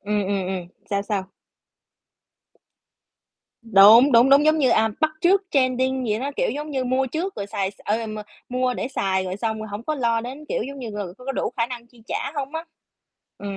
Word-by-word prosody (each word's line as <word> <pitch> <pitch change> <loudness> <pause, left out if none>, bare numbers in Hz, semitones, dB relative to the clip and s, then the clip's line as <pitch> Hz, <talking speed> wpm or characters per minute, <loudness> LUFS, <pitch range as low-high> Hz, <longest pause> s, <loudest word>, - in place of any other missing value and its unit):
Ừm, 205 0 -1
ừm, 195 -1 -1
ừm, 185 -2 -4 0.2
sao, 200 -1 0
sao? 200 -2 -3 2.3
Đúng, 225 +5 +7
đúng, 240 +3 +6
đúng, 280 +2 +6
giống 310 +1 +4
như, 270 -4 +3
à, 220 0 +3
bắt 315 -1 +3
trước 380 +4 +4
trending 260 -1 +1
gì 210 -1 0
đó, 275 +4 -3
kiểu, - - +1
giống 300 +1 -5
như, 265 -3 -1
mua 260 +1 +1
trước 335 +9 -3
rồi 200 - -4
xài 195 -1 -2
s - - -22
ờ, 215 +2 +1
ờ, 225 - -4
m 215 0 -6 0.3
mua 255 0 0
để - - -3
xài 190 -7 -1
rồi 185 0 -4
xong 220 +1 -2
rồi 215 0 -6
không 205 +2 -6
có 310 +5 -2
lo 235 -4 +1
đến 260 +6 -8
kiểu - - -1
giống 275 +4 -7
như, 240 -4 -6
người 205 -4 -6
có 250 - -13
có 270 - -2
đủ - - -2
khả 230 -2 +1
năng 240 -1 -8
chi 235 -1 -21
trả - - -3
hông 280 0 -4
á. 320 +1 -4 0.7
Ừm. 200 -1 -5
240 Hz, 225 wpm, -23 LUFS, 205-270 Hz, 2.3 s, Đúng